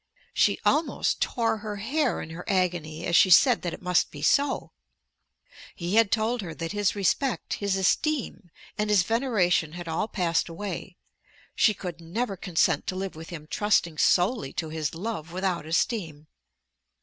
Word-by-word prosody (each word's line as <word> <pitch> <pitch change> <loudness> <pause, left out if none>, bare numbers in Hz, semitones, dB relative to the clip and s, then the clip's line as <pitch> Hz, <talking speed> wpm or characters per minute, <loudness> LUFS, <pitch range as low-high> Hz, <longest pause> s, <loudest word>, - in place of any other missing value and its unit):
She - - +3
almost 310 +2 +1
tore 225 -3 0
her 210 -1 -6
hair 255 +6 -1
in 165 - -9
her 170 +2 -7
agony 175 -4 -1
as 170 - +1
she 185 - +6
said 240 +6 +6
that 175 - -3
it - - -9
must 180 -1 +2
be - - -9
so. 280 -1 +2 1.0
He 175 +2 -4
had 225 -2 +4
told 230 +2 +1
her 165 -5 -7
that 165 +1 -4
his 205 -1 0
respect, 205 +6 0
his 200 -1 +1
esteem, 220 - 0 0.3
and 210 0 0
his 205 -3 +4
veneration, 195 - +1
had 175 0 -7
all 165 +6 -1
passed 175 -5 0
away. 185 +1 -6 0.6
She 215 - +3
could 175 -3 -7
never 195 +6 -3
consent 165 -4 0
to 185 - -2
live 190 -1 -4
with 160 +1 -9
him 155 -3 -8
trusting 170 -3 +1
solely 180 - +2
to 160 -2 -3
his 155 -1 -3
love 175 -4 -5
without 180 -3 -2
esteem. 160 -3 -1
185 Hz, 165 wpm, -26 LUFS, 165-215 Hz, 1.0 s, she